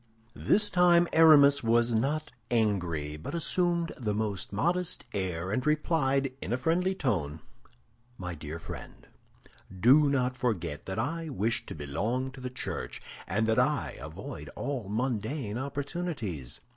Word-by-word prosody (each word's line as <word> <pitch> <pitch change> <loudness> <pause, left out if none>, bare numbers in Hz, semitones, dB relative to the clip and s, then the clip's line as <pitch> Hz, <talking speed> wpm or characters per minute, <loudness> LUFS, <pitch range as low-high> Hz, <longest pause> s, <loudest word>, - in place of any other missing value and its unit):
This 210 0 +4
time 175 -1 +5
Aramis 145 -3 +7
was 115 +1 +2
not 145 +6 0 0.2
angry, 90 -10 0
but 80 - -6
assumed 170 0 +1
the 105 -4 -1
most 105 -3 -2
modest 175 - -1
air 95 -2 -2
and 125 +4 0
replied 140 -3 +1
in - - -4
a 120 - +2
friendly 175 +8 +1
tone, 85 - -1 0.8
"My 90 -1 -5
dear 75 0 -6
friend, 80 - -9 0.7
do 140 +7 +6
not 130 -2 +1
forget 90 - -2
that 95 - -4
I 160 +8 -2
wish 115 -3 -1
to - - -6
belong 110 - -2
to 130 0 -11
the 125 - -4
Church, 125 - -5 0.3
and 110 +4 +1
that 110 +2 +2
I 145 +1 +1
avoid 95 - -8
all 130 -8 -3
mundane 115 +1 -2
opportunities. 140 - -4
125 Hz, 140 wpm, -29 LUFS, 100-150 Hz, 0.8 s, Aramis